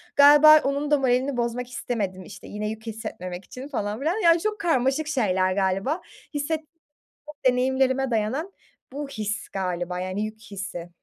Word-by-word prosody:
galiba 295 +2 +9
onun 280 +2 -1
da 295 - +6
moralini 260 +1 +1
bozmak 240 +1 -2
istemedim, 230 -6 -3
işte, 190 0 -11
yine 210 +1 -4
yük 220 +1 -7
hissetmemek 195 -5 -6
için 255 +2 -9
falan 210 -6 -3
filan, 315 +6 0
yani 335 0 +6
çok 425 +1 -2
karmaşık 295 -3 +1
şeyler 190 -10 +1
galiba. 195 - 0 0.3
Hisset 295 +2 -1 0.9
deneyimlerime 260 +1 +2
dayanan 240 - -1 0.4
bu 290 +1 -4
his 215 -4 -4
galiba, 180 -2 -3
yani 185 +2 -3
yük 215 0 -8
hissi. 195 -5 -7
245 Hz, 145 wpm, -25 LUFS, 200-285 Hz, 0.9 s, galiba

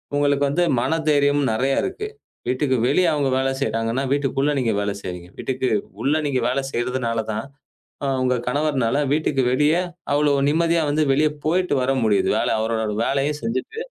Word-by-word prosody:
உங்களுக்கு 145 0 +2
வந்து 175 +5 +1 0.2
மன 160 +5 0
தைரியம் 145 0 +3
நிறைய 135 +5 +1
இருக்கு. 405 +3 -4 0.4
வீட்டுக்கு 130 0 +1
வெளிய 170 +6 +3
அவங்க 145 -3 +1
வேலை 135 0 +1
செய்றாங்கன்னா 115 +2 -1
வீட்டுக்குள்ள 140 0 0
நீங்க 115 -4 +1
வேலை 100 0 -2
செய்றீங்க. 90 -1 -7
வீட்டுக்கு 130 -1 -1 0.3
உள்ள 145 +3 +2
நீங்க 135 -3 0
வேலை 135 +2 -1
செய்றதுனால 120 -1 -1
தான் 110 +4 -3 0.8
உங்க 125 0 +2
கணவர்னால 140 -3 0 0.2
வீட்டுக்கு 150 -3 +1
வெளிய 150 +4 +3 0.4
அவ்வளவு 145 -1 +2
நிம்மதியா 165 +1 +2
வந்து 155 +1 +2
வெளிய 150 +3 +3 0.2
போயிட்டு 180 0 +1
வர 135 - +1
முடியுது. 105 -2 +2
வேலை - - 0
அவரோட 110 0 -1 0.2
வேலைய 140 +2 +1
செஞ்சிட்டு 445 - -3
140 Hz, 155 wpm, -22 LUFS, 125-150 Hz, 0.8 s, தைரியம்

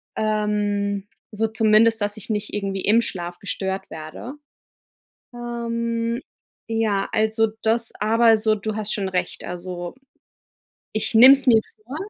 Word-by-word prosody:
ähm, 205 -2 -1 0.2
so 220 +1 0
zumindest, 220 +1 +4
dass 205 +1 -1
ich 215 - -8
nicht 210 -1 -2
irgendwie 195 -1 -2
im 225 +3 +4
Schlaf 175 -4 -6
gestört 190 -1 -4
werde. 160 - -8 1.0
Ähm, 235 0 -3 0.5
ja, 220 -3 0
also 220 +1 +2 0.2
das 225 +1 +1
aber 225 +1 +4
so, 215 0 +1
du 215 +1 -4
hast 215 -1 -3
schon 195 -2 -2
recht, 180 -1 -3
also, 175 0 -6 1.0
ich 215 +1 -2
nehme 255 +5 +10
es 270 0 0
mir 225 -3 +6 0.2
vor, 265 +5 -7
215 Hz, 135 wpm, -22 LUFS, 200-230 Hz, 1.0 s, nehme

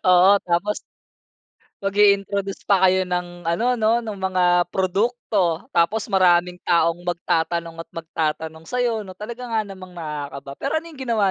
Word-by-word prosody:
Oo, 180 +2 +7
tapos 180 +4 0 1.0
mag-i-introduce 200 0 +2
pa 190 -2 +5
kayo 185 0 +3
ng 175 -1 -3
ano, 170 +7 0
no? 225 0 +2
No'ng 215 -3 -5
mga 185 -1 +1 0.3
produkto. 190 -2 0
Tapos 185 +6 +2
maraming 180 -3 +3
taong 170 0 +2
magtatanong 170 -1 -1
at - - -26
magtatanong 160 -1 -3
sa 250 - -2
'yo, 230 -3 0
'no? 185 -2 -11
Talaga 235 +4 -7
nga 225 -1 +1
namang 185 -2 -11
nakakaba, 145 -4 -6
pero 275 - -2
ano 330 - -11
'yong 290 -4 -13
ginawa 225 -6 +1
185 Hz, 150 wpm, -22 LUFS, 170-210 Hz, 1.0 s, Oo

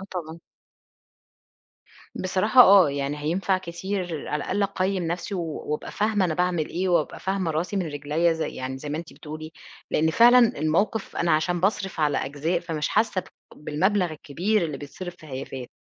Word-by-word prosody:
آه، - - -7
طبعًا. 165 -3 -6 1.8
بصراحة 195 +7 +3
آه، 190 -7 +7
يعني 140 +1 -2
هينفع 180 +5 0
كتير 180 -2 -4
على 150 -1 -2
الأقل 200 +2 -1
أقيّم 195 -1 0
نفسي 175 +4 -3
و 180 - -1 0.3
وأبقى 150 0 -4
فاهمة 210 -2 +1
أنا 160 -3 0
باعمل 180 -3 0
إيه 185 +2 -2
وأبقى 170 -4 +1
فاهمة 190 -3 -1
راسي 170 +6 -2
من 185 -4 0
رجليّا 150 +3 0
زي 160 0 -2
يعني 130 +1 -5
زي 150 - -7
ما 150 +2 -2
أنتِ 170 - -8
بتقولي، 155 0 -9 0.4
لإن 160 +1 +2
فعلًا 240 +6 +7 0.2
الموقِف 195 +8 0
أنا 170 - +1
عشان 170 +3 +1
باصرف 195 -2 -1
على 150 -2 +2
أجزاء، 145 +5 -1
فمش 155 -3 -3
حاسّة 215 -3 +1
بأ 185 - -18 0.3
بالمبلغ 180 +5 0
الكبير 175 +7 -1
اللي 155 -4 -3
بيتصرف 175 +5 -8
في 155 - -14
هيافات. 130 -2 -6
170 Hz, 170 wpm, -25 LUFS, 155-190 Hz, 1.8 s, آه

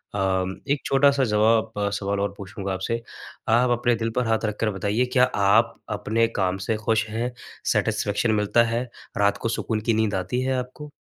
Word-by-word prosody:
अ, 95 -1 -1
एक 145 - +1
छोटा-सा 140 0 +4
ज़वाब 110 0 +2 0.2
सवाल 100 0 -2
और 100 0 -1
पूछूँगा 100 -1 -5
आपसे 115 +5 -2 0.5
आप 120 +2 +4
अपने 120 0 +2
दिल 115 0 -2
पर 125 -2 +1
हाथ 110 0 +1
रखकर 110 +1 -1
बताइए, 105 +4 0
क्या 125 -1 +5
आप 110 -1 +3
अपने 110 +2 +1
काम 95 -1 0
से 115 - +1
खुश 110 0 0
हैं? 115 +3 -2 0.4
सैटिस्फैक्शन 105 +2 +1
मिलता 110 +3 +3
है, 115 +1 -1 0.3
रात 100 0 +2
को 115 - -2
सुकून 110 -1 -2
की 115 +2 +1
नींद 110 -1 +1
आती 125 +7 -1
है 130 +1 0
आपको? 130 +4 -6
110 Hz, 180 wpm, -24 LUFS, 100-120 Hz, 0.5 s, क्या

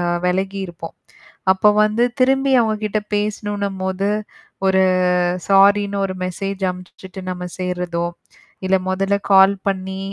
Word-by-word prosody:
அ - - 0 0.2
வெலகியிருப்போம். 190 -2 -3 0.6
அப்ப 200 +2 +4
வந்து 215 +3 +1 0.2
திரும்பி 270 +1 +3
அவங்ககிட்ட 215 -1 -1 0.2
பேசணும்னும்போது, 200 -2 -2 0.6
ஒரு 190 0 +3 0.7
சாரின்னு 200 +1 +4
ஒரு 185 - -4
மெசேஜ் 195 +2 -4
அம்ச்சுட்டு 185 +1 -11
நம்ம 180 0 -5
சேர்றதோ, 180 -2 -2 0.6
இல்ல 190 0 +3
மொதல்ல 195 +2 0
கால் 195 +1 +6
பண்ணி 190 0 -4
195 Hz, 105 wpm, -19 LUFS, 185-205 Hz, 0.7 s, கால்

